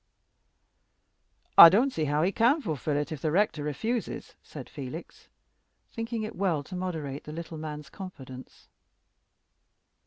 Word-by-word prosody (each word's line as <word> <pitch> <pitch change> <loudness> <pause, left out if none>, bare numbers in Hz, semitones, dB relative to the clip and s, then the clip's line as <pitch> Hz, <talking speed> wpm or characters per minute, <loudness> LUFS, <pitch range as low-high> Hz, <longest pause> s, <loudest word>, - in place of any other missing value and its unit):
"I 170 - +14
don't 245 +9 +2
see 155 - -1
how 150 +2 +1
he 185 - +2
can 240 - +3
fulfill 155 - -2
it 145 +2 -2
if 155 -3 -5
the 155 - 0
rector 175 -2 +1
refuses," 210 - -3
said 140 -4 -10
Felix, 145 +4 -9 0.6
thinking 230 -1 -4
it 215 - -6
well 175 -7 0
to 185 - -9
moderate 160 -7 -4
the 150 - -7
little 165 0 -7
man's 150 -2 -7
confidence. 130 -9 -10
160 Hz, 135 wpm, -28 LUFS, 145-200 Hz, 0.6 s, I